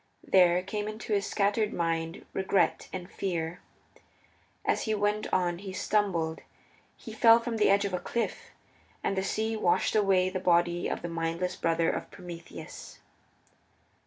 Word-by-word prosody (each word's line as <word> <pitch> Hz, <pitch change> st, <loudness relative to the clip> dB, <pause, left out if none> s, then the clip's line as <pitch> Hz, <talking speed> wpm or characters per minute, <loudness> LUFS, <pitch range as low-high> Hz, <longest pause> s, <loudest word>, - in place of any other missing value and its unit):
There 180 Hz, -1 st, +4 dB
came 205 Hz, +2 st, -3 dB
into 215 Hz, 0 st, -4 dB
his 200 Hz, 0 st, +1 dB
scattered 210 Hz, +1 st, +1 dB
mind 165 Hz, -1 st, -2 dB
Regret 190 Hz, -2 st, +1 dB
and 180 Hz, -1 st, -6 dB
Fear. 175 Hz, -3 st, -3 dB, 1.1 s
As -, -, +1 dB
he 220 Hz, -1 st, +1 dB
went 210 Hz, +1 st, 0 dB
on 175 Hz, -1 st, +1 dB
he 195 Hz, -1 st, -7 dB
stumbled. 185 Hz, -6 st, 0 dB, 0.6 s
He 225 Hz, -, -9 dB
fell 230 Hz, +1 st, +7 dB
from 230 Hz, -1 st, -3 dB
the 210 Hz, -, +4 dB
edge 200 Hz, +1 st, +4 dB
of 195 Hz, -, -3 dB
a 180 Hz, -, 0 dB
cliff, 235 Hz, +6 st, -3 dB, 0.6 s
and 195 Hz, -, 0 dB
the 190 Hz, -, +1 dB
sea 220 Hz, +3 st, -1 dB
washed 180 Hz, -2 st, +1 dB
away 190 Hz, -3 st, +3 dB
the 185 Hz, -, -2 dB
body 175 Hz, -1 st, +2 dB
of -, -, -3 dB
the -, -, -2 dB
mindless 165 Hz, +2 st, -2 dB
brother 165 Hz, 0 st, +1 dB
of -, -, -5 dB
Prometheus. 175 Hz, -3 st, -10 dB
185 Hz, 155 wpm, -29 LUFS, 175-210 Hz, 1.1 s, fell